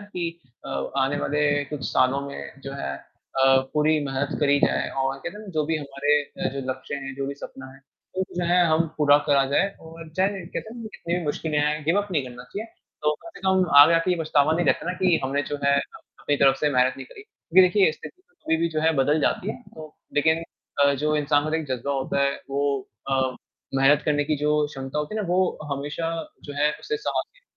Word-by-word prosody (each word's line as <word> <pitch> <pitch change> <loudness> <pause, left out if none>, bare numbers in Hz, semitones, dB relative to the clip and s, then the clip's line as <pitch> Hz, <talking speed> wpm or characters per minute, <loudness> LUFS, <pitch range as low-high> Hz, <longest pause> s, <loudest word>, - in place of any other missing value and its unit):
कि 170 -4 -5 0.3
अ, - - -6 0.3
आने 135 +2 +1
वाले 150 +1 0 0.2
कुछ 145 -1 -6
सालों 130 +2 +3
में 135 -1 -9
जो 135 - -5
है 70 - -4
अ, 135 - +1 0.2
पूरी 155 +1 +3
मेहनत 135 +1 -2
करी 145 -1 +4
जाए - - +2
और 135 0 -1
कहते - - -5
है 210 - -9
ना - - -12
जो 155 - +2
भी 160 0 0
हमारे 145 0 0
अ, 180 +5 -4
जो 140 - -3
लक्ष्य 130 +2 -5
हैं, 135 -1 -6
जो 135 0 -3
भी 140 - -4
सपना 130 -1 -9
है, 135 - -16 0.4
वो 190 - +1
जो 175 - 0
है 180 0 +5
हम 160 +1 +3
पूरा 145 -1 +6
करा 140 -1 +4
जाए 195 +7 +3
और 165 0 -11
चाहे 190 0 0
कहते 220 +4 -6
हैं - - -10
ना, 225 - -6
कितनी 170 - -3
भी 170 - -5
मुश्किलें 150 +1 -1
आएँ, 150 0 0
गिव 170 +6 +3
अप 205 - -11
नहीं 145 -5 +1
करना 125 0 -10
चाहिए। 210 - -6 0.4
तो 150 0 +2
कम - - -10
से - - -12
कम 190 -1 +4
आगे 150 +4 +9
आकर 165 +2 +2
ये 180 - +2
पछतावा 155 -1 +3
नहीं 170 +1 +1
रहता - - +1
है 180 - 0
ना 180 - -9
कि 180 -3 +4
हमने 140 +2 0
जो - - 0
है, 140 0 +4
अपनी 145 +1 -4
तरफ 135 -1 +4
से 150 - +3
मेहनत 125 0 +3
नहीं - - -8
करी, 445 -4 -13
क्योंकि 185 - +3
देखिए 195 -3 +4
स्थिति 365 - -12
कभी 160 - -1
भी 170 +1 +1
जो 155 -1 -2
है 160 +1 +3
बदल 145 +3 +3
जाती 195 +7 0
है, 245 - -8
तो 155 -1 -10 0.2
लेकिन 160 +3 +3 0.4
अ, 140 - +5
जो 150 +2 0
इंसान 145 0 +2
के 150 - -4
अंदर 160 +1 0
एक 160 - -5
ज़ज्बा 140 +4 -3
होता 135 0 -1
है, 140 0 +2 0.2
वो 140 -1 -1 0.2
अ, 130 -1 0 0.4
मेहनत 140 +2 +4
करने 145 -1 +1
की 155 0 0
जो 150 +1 +1 0.2
क्षमता 135 0 -5
होती 150 +7 -3
है 215 - -1
ना, 200 - -3
वो 185 +1 +1
हमेशा 145 +4 -3 0.4
जो 145 - -7
है 150 +1 +2
उससे 440 +1 -2
साथ 420 - -1
देती - - -25
150 Hz, 240 wpm, -24 LUFS, 140-170 Hz, 0.4 s, आगे